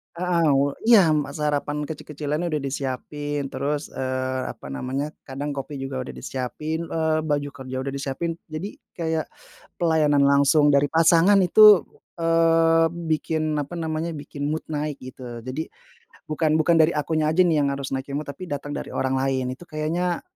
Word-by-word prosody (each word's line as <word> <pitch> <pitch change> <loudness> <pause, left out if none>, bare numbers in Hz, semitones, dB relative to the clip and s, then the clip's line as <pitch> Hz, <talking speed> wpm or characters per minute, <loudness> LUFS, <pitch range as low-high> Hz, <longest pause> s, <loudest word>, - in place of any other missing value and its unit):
Heeh, 175 -1 +1
u 140 +1 +1
iya 215 -8 +7
ma 150 -2 0
sarapan 150 0 -2
kecil-kecilan 150 +1 -4
udah 155 -3 -1
disiapin. 140 +1 -3
Terus, 145 +3 -3
eee, 130 0 -2
apa 70 - -8
namanya, 130 - -3 0.2
kadang 140 +2 -5
kopi 135 +2 -5
juga 135 -1 -4
udah - - -8
disiapin, 150 +6 -4
eee, 160 -1 0
baju 145 -2 -1
kerja 130 -2 -8
udah 135 - -3
disiapin, 140 +5 -3
jadi 160 +6 -6 0.2
kayak 160 -2 -2 0.6
pelayanan 155 -4 +3
langsung 140 +2 +5
dari 140 0 +4
pasangan 165 +5 +5
itu, 205 +1 +8 0.4
eee, 165 0 +4 0.2
bikin 155 0 0
apa 145 +2 -4
namanya, 165 0 -3
bikin 145 -1 -6
mood 160 - -3
naik, 150 -1 -3
gitu. 125 -2 -8
Jadi 130 +7 -4 0.6
bukan 155 0 +2
bukan 170 +1 +3
dari 160 +1 +4
akunya 155 +1 0
aja, 180 - +4
nih, 170 -3 +3
yang 140 - 0
harus 140 0 -5
naikin 135 +1 -4
mood, 145 +1 -3
tapi 140 +6 -7
datang 145 -3 -5
dari - - -7
orang 130 0 0
lain, 130 -1 0
itu 175 - -13
kayaknya 170 +3 -2
150 Hz, 160 wpm, -24 LUFS, 140-165 Hz, 0.6 s, itu